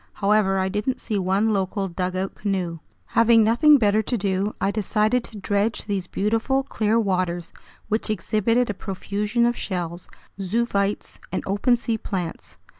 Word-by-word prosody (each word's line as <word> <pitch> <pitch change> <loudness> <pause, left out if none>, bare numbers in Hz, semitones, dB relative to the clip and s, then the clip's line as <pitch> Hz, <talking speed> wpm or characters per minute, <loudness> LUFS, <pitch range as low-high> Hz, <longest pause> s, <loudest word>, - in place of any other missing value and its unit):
However, 200 -1 +2
I 190 0 +1
didn't 210 +6 -2
see 210 -3 -2
one 195 +4 +1
local 195 0 -1
dugout 185 +1 -2
canoe. 185 -5 -2 0.3
Having 230 -1 +6
nothing 290 +7 +6
better 215 -3 +3
to 240 +3 -2
do, 195 0 -1
I 195 - +1
decided 215 +3 +1
to 220 - -10
dredge 205 +2 -1
these 195 -4 -2
beautiful, 225 +8 0
clear 220 -3 +1
waters, 185 -4 -1 0.3
which 215 +1 -1
exhibited 215 +4 +1
a - - -5
profusion 205 +4 -1
of 240 0 +1
shells, 175 -4 -4 0.3
zoophytes, 200 0 -1
and 185 - -2
open 205 +6 +2
sea 230 -1 -2
plants. 180 -6 -5
205 Hz, 150 wpm, -23 LUFS, 190-225 Hz, 0.3 s, Having